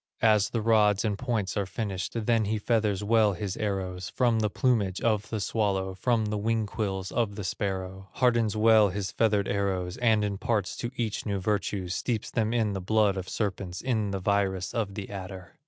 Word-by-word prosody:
As 110 -2 +4
the 115 -2 -2
rods 105 -2 +3
and 105 -2 0
points 110 -4 -2
are 100 -3 -1
finished, 95 -2 -4
Then 115 -2 +2
he 110 +2 0
feathers 105 -2 0
well 110 -1 +3
his 100 0 -4
arrows 95 -3 -3
From 120 -3 +2
the 105 -1 +1
plumage 100 -5 +1
of 110 -2 0
the 110 - -2
swallow, 100 -3 0
From 115 +3 +1
the 105 0 -2
wing 110 +1 0
quills 95 -2 -3
of 115 -4 0
the 105 - -5
sparrow; 95 0 -4
Hardens 115 -4 +2
well 110 -1 +6
his 100 +1 -3
feathered 105 -3 +2
arrows, 95 -3 -1
And 110 -3 +3
imparts 105 0 -1
to 120 - -3
each 115 -3 -2
new 100 -1 0
virtues, 95 -2 -1
Steeps 110 +3 -2
them 110 -2 0
in 110 -4 +1
the 95 - -3
blood 105 +1 +2
of 95 -1 -5
serpents, 95 -4 -3
In 110 -5 0
the 100 -1 -2
virus 95 -1 0
of 105 -4 -2
the 100 -2 -5
adder. 95 -2 -8
105 Hz, 190 wpm, -28 LUFS, 95-110 Hz, -, well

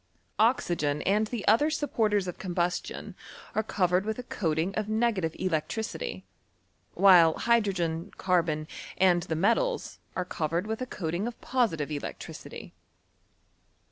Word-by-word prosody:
Oxygen 175 - +2
and 210 +3 +2
the 225 -2 -5
other 235 +9 +5
supporters 215 -10 0
of 180 - -6
combustion 180 -1 -2 0.4
are 220 - +1
covered 185 -3 +1
with 220 +1 -3
a 250 - -5
coating 165 -4 -1
of 215 0 -2
n^;ative 215 -7 0
electricity; 215 - -2 0.7
while 175 -5 +7
hydrogen, 190 -7 +1
carbon, 165 -4 +1 0.3
and 180 -2 +4
the 160 - -3
metals, 235 - 0 0.2
are 185 - -1
covered 170 +1 -2
with 220 +2 -4
a 255 - -3
coating 175 0 -3
of 240 - -7
positive 185 - 0
electricity. 145 -1 -7
190 Hz, 125 wpm, -28 LUFS, 170-220 Hz, 0.7 s, while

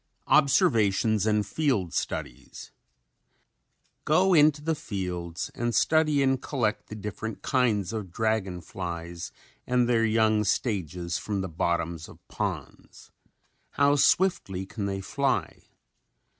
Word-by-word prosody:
] - - -45
OBSERVATIONS 110 -6 +3
AND 105 -1 +2
FIELD 125 - -1
STUDIES - - -5 1.3
Go 185 +5 +3
into 150 -2 +4
the 160 +1 +1
fields 90 - -5
and 120 0 -2
study 155 -3 +3
and 135 -1 +1
collect 115 -7 -2
the 110 - -8
different 105 +1 -6
kinds 115 -7 +1
of 105 -5 -5
dragon 105 -4 -1
flies 85 -1 -6 0.4
and 125 -1 +2
their 115 -2 +2
young 110 -1 +3
stages 90 - -2
from 100 -2 -3
the 95 - -4
bottoms 85 -1 -2
of - - -14
ponds. - - -6 0.7
How 140 0 +4
swiftly 135 - +2
can 100 +1 -4
they 95 -1 -3
fly? 135 +7 -2
110 Hz, 120 wpm, -27 LUFS, 95-135 Hz, 1.3 s, into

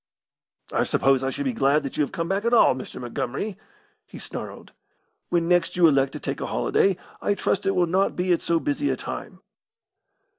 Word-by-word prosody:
"I - - +2
suppose 135 -1 +2
I 135 - 0
should 285 - -4
be 260 - 0
glad 150 -8 +2
that 140 - -5
you - - 0
have 140 - -4
come 165 0 -3
back 195 +3 -1
at 235 +1 +3
all, 225 - +6
Mr. 130 - -8
Montgomery!" 130 - -4 0.5
he - - -11
snarled. - - -8 0.6
"When 170 -1 +1
next 175 0 +2
you 175 - +6
elect 135 -4 +3
to - - -6
take - - -4
a - - -2
holiday, 195 -2 +1 0.2
I 205 - +1
trust 195 0 -1
it 195 - +2
will 180 - +3
not 190 +4 +1
be 180 0 +1
at 170 - 0
so 165 -1 +1
busy 290 - -1
a - - +1
time." - - -7
175 Hz, 210 wpm, -24 LUFS, 140-195 Hz, 0.6 s, all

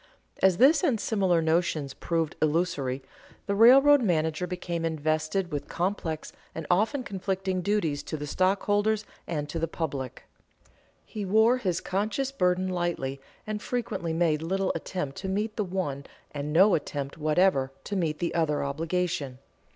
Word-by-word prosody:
As 190 -2 +4
this 280 +5 +5
and 230 -5 +2
similar 190 -6 +1
notions 160 -4 0
proved 165 -2 -2
illusory, 150 -5 0 0.4
the 200 - -1
railroad 270 +7 +7
manager 160 -4 0
became 175 -2 -4
invested 155 +3 -1
with 145 -1 -4
complex 170 -3 -3 0.2
and 160 - -5
often 220 +9 +2
conflicting 190 -2 -2
duties 175 -7 0
to 155 - -4
the 150 - -5
stockholders 205 +6 +1 0.2
and 150 -3 -2
to 165 +3 -4
the 165 - 0
public. 140 -6 -4 0.8
He 210 - -6
wore 220 +5 +4
his 185 -8 -1
conscience 215 +8 -1
burden 185 -6 +1
lightly, 175 -7 -2 0.2
and 215 -1 -4
frequently 225 -10 -3
made 160 -2 +1
little 190 +3 0
attempt 145 -7 -4
to 190 - -4
meet 210 +3 -1
the 210 - 0
one 175 -8 -3 0.3
and 145 0 -4
no 190 +6 +6
attempt 140 -1 -3
whatever 155 -3 +2
to 205 - -4
meet 160 -5 0
the 175 - -2
other 160 -3 +1
obligation. 160 -1 -2
175 Hz, 150 wpm, -27 LUFS, 155-200 Hz, 0.8 s, railroad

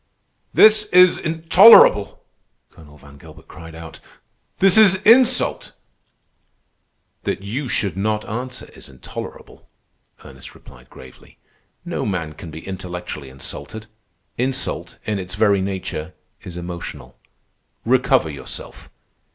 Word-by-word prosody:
"This 215 0 +5
is 180 -3 +4
intolerable!" 165 - +5 0.5
Colonel 75 -2 -17
Van 70 0 -17
Gilbert - - -16
cried 80 -1 -13
out. 80 0 -11 0.6
"This 195 -1 +4
is 210 -4 +6
insult!" 250 +3 +3 1.5
"That - - -4
you 125 +7 -5
should 100 -5 -2
not 105 +2 -2
answer 125 +4 -6
is - - -11
intolerable," 65 -2 -11 0.6
Ernest - - -13
replied 60 +1 -18
gravely. 65 -1 -16 0.5
"No - - -4
man 85 -6 -4
can 85 +2 -11
be 80 +1 -11
intellectually 90 -6 -7
insulted. 105 +11 -9 0.5
Insult, 130 +1 -3
in 105 -2 -2
its 90 0 -8
very 100 -2 +2
nature, 95 -3 -6 0.3
is 90 -1 -10
emotional. 85 -1 -9 0.7
Recover 130 - +1
yourself. 70 - -10
100 Hz, 110 wpm, -19 LUFS, 80-135 Hz, 1.5 s, is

